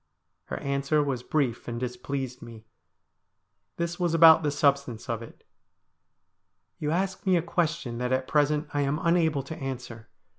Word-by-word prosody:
Her - - -5
answer 140 +2 +1
was 135 -4 -2
brief 125 -4 -1
and 120 -1 -4
displeased 125 +1 -4
me. 115 -2 -11 1.1
This 170 +1 -3
was 175 -2 +1
about 160 -1 +8
the 150 - 0
substance 140 -4 0
of 115 -2 -2
it: 115 - -13 0.7
' - - -51
You 150 - -2
ask 190 +4 -1
me 185 -2 +3
a 165 - 0
question 165 -8 -1
that 125 0 -2
at 130 0 0
present 150 0 +2
I 145 - +1
am 140 +1 0
unable 160 -4 +2
to 150 +4 -7
answer. 125 -4 -7
140 Hz, 160 wpm, -27 LUFS, 125-160 Hz, 1.1 s, about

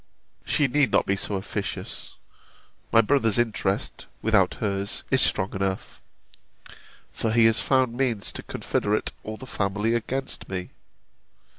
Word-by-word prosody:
She 145 - +2
need 140 +1 +3
not - - +3
be 100 - +1
so 100 +1 -1
officious: 95 0 -4 0.8
my 115 - +7
brother's 115 -2 +2
interest, 110 -4 -1 0.2
without 105 -4 +3
hers, 100 -2 -2
is - - +4
strong 95 - +2
enough; 95 -1 -3 1.1
for 110 - -1
he 115 0 +5
has 115 0 +4
found 130 -3 +2
means 120 -6 0
to - - -5
confederate 105 +1 -1
all 110 0 -6
the 130 - -9
family 105 0 0
against 130 +3 -3
me. 90 -1 -4
110 Hz, 135 wpm, -25 LUFS, 100-120 Hz, 1.1 s, my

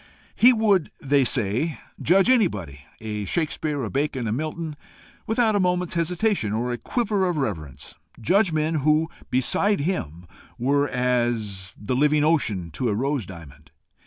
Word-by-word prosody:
He 245 - +7
would, 215 -7 +2
they 140 0 +2
said, 125 +6 +1 0.2
judge 190 +5 +4
anybody 105 - +1 0.2
a 105 -2 -4
Shakespeare, 150 - -2
a 110 - -3
Bacon, 135 -3 -1
a - - -1
Milton 155 +4 -4 0.5
without 220 -1 +2
a - - +2
moment's 180 -1 0
hesitation 170 - 0
or 120 +3 -1
a 120 - -4
quiver 210 -6 0
of 175 - -2
reverence 80 - -4 0.3
judge 190 - +2
men 155 +1 0
who, 155 +3 +2 0.2
beside 185 +9 +2
him, 90 - -3 0.3
were 140 +3 +1
as 120 -6 -1
the 105 +5 -2
living 150 +2 +3
ocean 110 - 0
to 120 - -2
a 105 - 0
rose 135 -2 -1
diamond. 75 -4 -12
145 Hz, 150 wpm, -24 LUFS, 110-175 Hz, 0.5 s, He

